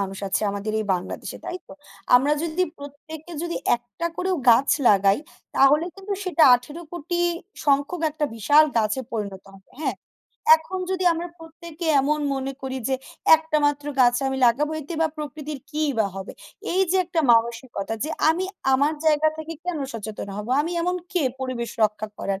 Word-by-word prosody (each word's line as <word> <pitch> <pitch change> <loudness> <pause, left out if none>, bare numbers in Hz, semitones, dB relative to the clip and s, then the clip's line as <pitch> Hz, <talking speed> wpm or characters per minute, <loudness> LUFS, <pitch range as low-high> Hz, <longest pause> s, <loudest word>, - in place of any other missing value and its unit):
মানুষ 195 -1 -3
আছি 190 - 0
আমাদের 205 +2 -4
এই - - -3
বাংলাদেশে 180 - -6
তাইতো? 360 0 -7 0.4
আমরা 275 +4 +5
যদি 335 +2 0 0.2
প্রত্যেকে 310 +4 -10
যদি 340 0 -3 0.2
একটা 240 +8 -6
করেও 370 0 0
গাছ 250 +4 +4 0.2
লাগাই 195 +1 +4 0.4
তাহলে 295 +4 +5
কিন্তু 395 +1 -6
সেটা 350 -3 +2
১৮,০০,০০,০০০ 335 +6 -4 0.5
সংখ্যক 285 +5 +2
একটা 300 0 -2
বিশাল 290 +8 +5
গাছে 215 +4 0
পরিণত 200 -4 -4
হবে। 190 0 -19
হ্যাঁ, 265 -9 -1 0.6
এখন 370 +4 -6
যদি 370 -1 -1
আমরা 340 +2 -4
প্রত্যেকে 325 +1 -9
এমন 300 +3 +1 0.2
মনে 270 0 -3
করি 265 0 -3
যে, 265 - +1 0.4
"একটা 320 -1 -1
মাত্র 290 0 -1
গাছ 245 -1 +5
আমি 265 - -2
লাগাবো 295 +6 +2
এতে 305 +4 -7
বা 320 - +2
প্রকৃতির 300 -1 -6
কি 305 +1 -2 0.2
বা 215 - +3
হবে?" 195 +1 -6 0.4
এই 380 +2 +3
যে 380 - +3
একটা 340 -2 -1
মানসিকতা 230 -2 0
যে 315 - -3 0.2
আমি 340 +4 +2 0.3
আমার 290 +4 +2
জায়গা 310 0 +4
থেকে 320 +1 -6
কেন 355 -3 -2
সচেতন 215 -2 -6
হব? 210 +1 -5 0.2
আমি 335 - -3
এমন 360 +1 0 0.2
কে 360 - +1 0.2
পরিবেশ 240 -3 -3
রক্ষা 215 0 -2
করার? 195 0 -2
290 Hz, 165 wpm, -24 LUFS, 235-330 Hz, 0.6 s, আমরা